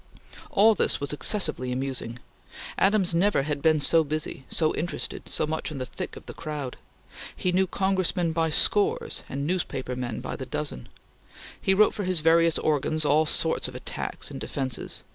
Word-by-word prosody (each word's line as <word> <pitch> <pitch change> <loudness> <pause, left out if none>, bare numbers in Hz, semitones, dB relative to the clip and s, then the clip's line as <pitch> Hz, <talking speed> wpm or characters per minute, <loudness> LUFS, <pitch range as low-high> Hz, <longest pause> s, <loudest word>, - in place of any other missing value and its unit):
All 220 +3 +5
this - - +1
was 140 +1 -2
excessively 150 - 0
amusing. 125 -2 -3 0.6
Adams 195 -3 +3
never 175 -3 +2
had 145 -1 -2
been 155 0 +4
so 160 +3 +5
busy, 150 -3 -4
so 155 -2 +2
interested, 170 +2 -4
so - - +2
much 160 +1 -3
in 150 - -6
the 130 - -3
thick - - -7
of - - -11
the - - -8
crowd. 145 -4 -5 0.6
He 180 - -1
knew 190 +1 +2
Congressmen 185 -3 0
by 160 0 +1
scores 415 - +2
and 140 +1 -3
newspaper 140 -7 -2
men 120 -3 -4
by - - -5
the - - -7
dozen. 60 -1 -4 0.7
He 190 - +3
wrote 215 +2 +5
for 205 - -4
his 185 -3 0
various 165 +1 +4
organs 155 +1 +1
all 150 +2 +3
sorts 160 +1 +1
of - - -10
attacks - - -5
and - - -7
defences. 130 -4 -4
155 Hz, 175 wpm, -26 LUFS, 140-185 Hz, 0.7 s, All